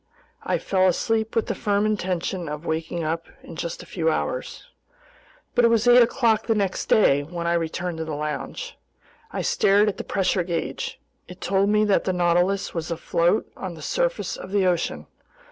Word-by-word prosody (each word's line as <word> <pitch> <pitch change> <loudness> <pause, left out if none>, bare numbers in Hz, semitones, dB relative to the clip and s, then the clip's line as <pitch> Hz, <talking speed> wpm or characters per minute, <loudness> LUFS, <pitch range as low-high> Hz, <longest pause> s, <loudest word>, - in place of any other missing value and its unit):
I - - 0
fell 190 -1 +2
asleep 220 +4 0
with 225 - +2
the - - -2
firm 205 -2 0
intention 185 -4 -2
of 150 +2 -6
waking 160 +1 -2
up 165 +2 -2 0.2
in - - -10
just 170 0 -5
a - - -13
few 165 -3 -1
hours. - - -3 0.9
But 245 - +3
it - - +7
was 230 0 +2
eight 245 0 +8
o'clock 230 -2 +2
the 225 - +2
next 200 -3 -1
day 145 -10 +4
when 170 +3 -6
I 170 - +2
returned 170 0 -2
to 160 - -3
the 155 -2 -4
lounge. 150 - -4 0.6
I - - -3
stared 205 +2 +3
at 200 - -5
the - - -4
pressure 195 -1 0
gauge. 170 -1 -3 0.3
It 180 +1 -11
told 195 +2 +1
me 210 0 +3
that 205 -2 +2
the 185 - +1
Nautilus 180 +3 +1
was 165 -1 -4
afloat 170 +3 +1
on 185 -3 -6
the 155 - -10
surface - - -1
of 185 - -8
the 200 -1 +2
ocean. 175 -2 0
185 Hz, 190 wpm, -24 LUFS, 170-210 Hz, 0.9 s, eight